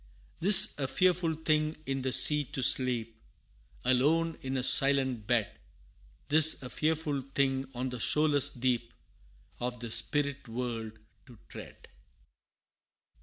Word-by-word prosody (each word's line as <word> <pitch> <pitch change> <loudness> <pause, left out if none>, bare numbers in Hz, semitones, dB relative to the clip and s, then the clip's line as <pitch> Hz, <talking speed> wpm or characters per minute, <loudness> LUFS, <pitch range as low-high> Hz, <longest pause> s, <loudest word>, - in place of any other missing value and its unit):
'Tis 195 +4 +8
a 135 - -3
fearful 175 +1 -1
thing 155 0 -2
in 135 0 -4
the 130 0 -4
sea 150 +3 +3
to 130 0 -6
sleep 115 -3 0 0.6
Alone 155 +6 0
in 135 0 -5
a 125 - -3
silent 130 -5 0
bed 115 -7 -2 0.7
'Tis 155 -1 +5
a 125 - -9
fearful 155 -2 -3
thing 135 -1 -1
on 125 +2 -4
the 125 -1 -8
shoreless 150 +1 +2
deep 120 -2 -4 0.6
Of 125 0 -6
the 115 -1 -8
spirit 140 +4 -3
world 115 -2 -6 0.3
to 120 -3 -17
tread! - - -13
135 Hz, 125 wpm, -28 LUFS, 125-150 Hz, 0.7 s, Tis